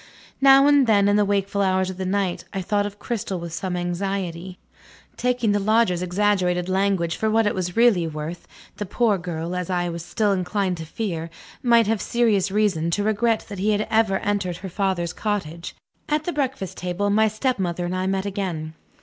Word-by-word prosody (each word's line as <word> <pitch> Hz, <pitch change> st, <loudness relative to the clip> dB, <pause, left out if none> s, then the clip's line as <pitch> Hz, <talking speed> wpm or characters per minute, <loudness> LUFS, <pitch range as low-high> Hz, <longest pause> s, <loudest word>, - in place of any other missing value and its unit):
Now 275 Hz, 0 st, +7 dB
and 285 Hz, -3 st, +5 dB
then, 200 Hz, -2 st, +4 dB
in 205 Hz, -, +3 dB
the 210 Hz, -, +4 dB
wakeful 200 Hz, 0 st, 0 dB
hours 190 Hz, -1 st, +1 dB
of 185 Hz, -, -10 dB
the 190 Hz, -1 st, -3 dB
night, 190 Hz, -2 st, -1 dB
I 195 Hz, -2 st, -3 dB
thought 205 Hz, +2 st, 0 dB
of 205 Hz, 0 st, -10 dB
Cristel 210 Hz, -5 st, -3 dB
with 170 Hz, -1 st, -7 dB
some 180 Hz, 0 st, -3 dB
anxiety. 180 Hz, 0 st, -3 dB, 0.6 s
Taking 245 Hz, -3 st, +1 dB
the 205 Hz, -, +2 dB
Loger's 215 Hz, -3 st, +2 dB
exaggerated 180 Hz, -1 st, +1 dB
language 190 Hz, -3 st, +1 dB
for 220 Hz, -, 0 dB
what 225 Hz, +1 st, +3 dB
it 205 Hz, -, +1 dB
was 180 Hz, 0 st, -3 dB
really 220 Hz, -8 st, +4 dB
worth, 155 Hz, +2 st, -6 dB, 0.3 s
the 205 Hz, -, -4 dB
poor 215 Hz, -2 st, +1 dB
girl 170 Hz, 0 st, -4 dB
(as 180 Hz, -1 st, -3 dB
I 175 Hz, -1 st, 0 dB
was 170 Hz, -1 st, -5 dB
still 210 Hz, +3 st, 0 dB
inclined 185 Hz, 0 st, -1 dB
to 165 Hz, -, -6 dB
fear) 170 Hz, -4 st, -4 dB, 0.3 s
might 235 Hz, -3 st, +4 dB
have 215 Hz, -1 st, 0 dB
serious 220 Hz, -5 st, +1 dB
reason 190 Hz, -5 st, +1 dB
to 205 Hz, +5 st, 0 dB
regret 220 Hz, +1 st, +1 dB
that 200 Hz, -2 st, -7 dB
he 210 Hz, +3 st, +2 dB
had 210 Hz, +1 st, -1 dB
ever 220 Hz, -3 st, +3 dB
entered 200 Hz, -4 st, -2 dB
her 190 Hz, -, -7 dB
father's 185 Hz, -2 st, -1 dB
cottage. 175 Hz, -6 st, -4 dB, 0.3 s
At 300 Hz, 0 st, +1 dB
the 350 Hz, -, -3 dB
breakfast 265 Hz, -, -3 dB
table, 180 Hz, +3 st, -1 dB
my 220 Hz, +2 st, +4 dB
stepmother 200 Hz, -6 st, -1 dB
and 180 Hz, +1 st, -2 dB
I 185 Hz, 0 st, -1 dB
met 190 Hz, 0 st, -1 dB
again. 180 Hz, -6 st, -3 dB
195 Hz, 195 wpm, -23 LUFS, 180-215 Hz, 0.6 s, Now